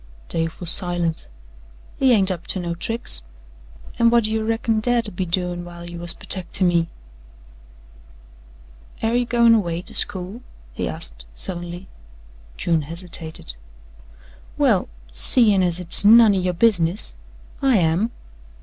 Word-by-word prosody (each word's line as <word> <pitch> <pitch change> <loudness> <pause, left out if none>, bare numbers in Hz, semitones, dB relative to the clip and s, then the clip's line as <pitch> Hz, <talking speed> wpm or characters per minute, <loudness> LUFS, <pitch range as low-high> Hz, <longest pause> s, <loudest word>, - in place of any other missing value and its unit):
Dave 165 0 -2
was 175 -2 +2
silent. 175 - +2 0.7
"He 265 -1 +3
ain't 195 -5 +3
up 175 -2 -6
to 190 - -3
no 170 -1 -3
tricks. 175 - +1 0.8
An' 235 0 +5
whut 235 0 +3
do 215 - 0
you 220 0 -1
reckon 225 0 0
Dad 235 0 0
'ud 205 - -10
be 185 0 -3
doin' 175 0 -2
while 175 0 -10
you 175 0 -8
was 175 0 +4
pertecting 185 0 -1
me?" 170 -1 +1 2.1
"Air 225 +1 +1
ye 245 0 +1
goin' 235 -1 +4
away 175 -6 0
to - - -9
school?" 190 +5 -2 0.3
he - - -3
asked - - -3
suddenly. 175 - -6 0.7
June 165 -2 0
hesitated. 165 - -7 1.0
"Well, - - +2 0.2
seein' 200 - +3
as 175 -2 0
hit's 180 +1 +2
none 220 0 +7
o' - - +1
yo' 180 0 -1
business 180 -2 +1 0.5
I 265 -4 +3
am." 175 +5 +1
180 Hz, 140 wpm, -21 LUFS, 170-220 Hz, 2.1 s, none